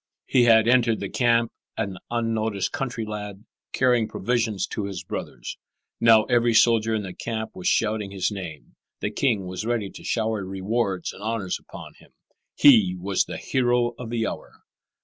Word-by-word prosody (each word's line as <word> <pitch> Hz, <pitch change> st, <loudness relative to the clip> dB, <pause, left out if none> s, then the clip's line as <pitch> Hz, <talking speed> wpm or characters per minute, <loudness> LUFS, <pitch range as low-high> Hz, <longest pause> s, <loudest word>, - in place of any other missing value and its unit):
He 125 Hz, -3 st, +3 dB
had 110 Hz, -1 st, +6 dB
entered 120 Hz, -2 st, +3 dB
the -, -, -5 dB
camp 115 Hz, -2 st, +2 dB, 0.3 s
an 95 Hz, -2 st, -3 dB
unnoticed 110 Hz, -4 st, -1 dB
country 125 Hz, -5 st, -3 dB
lad, 105 Hz, -1 st, -7 dB, 0.3 s
carrying 125 Hz, -3 st, +2 dB
provisions 110 Hz, -3 st, -1 dB
to 105 Hz, -, -3 dB
his 100 Hz, -2 st, -5 dB
brothers. -, -, -6 dB, 0.4 s
Now 115 Hz, -2 st, +6 dB
every 120 Hz, -1 st, +2 dB
soldier 115 Hz, -1 st, +4 dB
in 105 Hz, -, -2 dB
the 95 Hz, -2 st, -6 dB
camp 110 Hz, +2 st, -4 dB
was 90 Hz, -, -4 dB
shouting 105 Hz, -2 st, +1 dB
his 95 Hz, +1 st, -1 dB
name; 90 Hz, -7 st, -8 dB, 0.2 s
the 105 Hz, -, -2 dB
king 110 Hz, -5 st, 0 dB
was 90 Hz, +2 st, -5 dB
ready 115 Hz, -4 st, -1 dB
to -, -, -12 dB
shower 110 Hz, -3 st, -1 dB
rewards 95 Hz, +1 st, -2 dB
and -, -, -13 dB
honors 110 Hz, -4 st, -2 dB
upon -, -, -11 dB
him. -, -, -21 dB, 0.4 s
He 110 Hz, -10 st, +6 dB
was 95 Hz, +1 st, 0 dB
the -, -, -6 dB
hero 120 Hz, -2 st, +1 dB
of 125 Hz, -2 st, -6 dB
the 115 Hz, -1 st, -1 dB
hour. -, -, -7 dB
110 Hz, 170 wpm, -24 LUFS, 100-120 Hz, 0.4 s, had